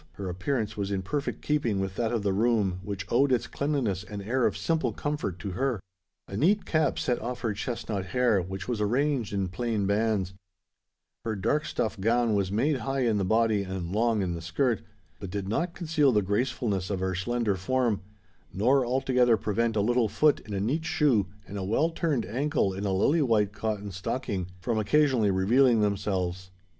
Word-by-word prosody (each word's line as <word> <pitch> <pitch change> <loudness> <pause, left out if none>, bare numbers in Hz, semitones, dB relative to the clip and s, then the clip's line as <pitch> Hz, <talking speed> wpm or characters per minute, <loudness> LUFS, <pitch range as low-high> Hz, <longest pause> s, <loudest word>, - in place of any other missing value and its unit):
—her 95 +3 -6
appearance 110 +5 -2
was 100 -1 -2
in 95 -1 -2
perfect 145 +9 -3
keeping 125 -9 0
with 95 -1 -3
that 115 -1 0
of 115 -4 -1
the 100 -1 +1
room 105 -4 +1
which 100 0 -5
owed 135 +3 +3
its 120 -2 +2
cleanliness 130 -11 -1
and 100 +2 -7
air 125 +4 +2
of - - -3
simple 165 -1 0
comfort 145 - -3
to 95 +3 -5
her. 125 +4 -1 0.5
A 95 - -7
neat 190 - +2
cap 155 -2 +1
set 125 - 0
off 125 +2 -4
her 115 -3 0
chesnut 105 -3 -3
hair, 115 0 +2
which 95 +2 -6
was 120 -4 -2
arranged 125 +2 +1
in 100 -2 -1
plain 105 +2 -1
bands: 100 -2 +1 0.9
her 110 -2 -2
dark 145 +10 0
stuff 110 -2 -2
gown 115 +2 +2
was 100 -2 0
made 135 +8 +1
high 135 +3 -2
in 115 -4 +2
the - - 0
body 110 +1 +2
and 95 -3 -4
long 110 0 +2
in 90 -2 -1
the 85 - -5
skirt, 115 +8 0 0.4
but 100 - -6
did 100 0 -4
not 170 - -1
conceal 155 -5 +2
the 105 -3 +2
gracefulness 105 -2 -1
of 100 -2 -1
her 95 0 -1
slender 115 +3 0
form, 115 +1 0 0.5
nor 130 +9 +3
altogether 125 -2 +3
prevent 115 +3 0
a 105 - +2
little 120 +1 +2
foot 145 +8 +3
in 105 -2 -7
a - - -1
neat 135 +11 0
shoe 130 - +2 0.2
and 100 +1 -6
a - - -3
well 130 - +1
turned 160 -7 0
ankle 135 -4 0
in 95 +2 -4
a 100 - 0
lily 140 - +3
white 105 -6 +2
cotton 105 -2 -3
stocking 95 0 -3
from 110 +3 0
occasionally 125 -1 +3
revealing 115 +5 +4
themselves. 95 -3 -1
110 Hz, 195 wpm, -28 LUFS, 100-130 Hz, 0.9 s, revealing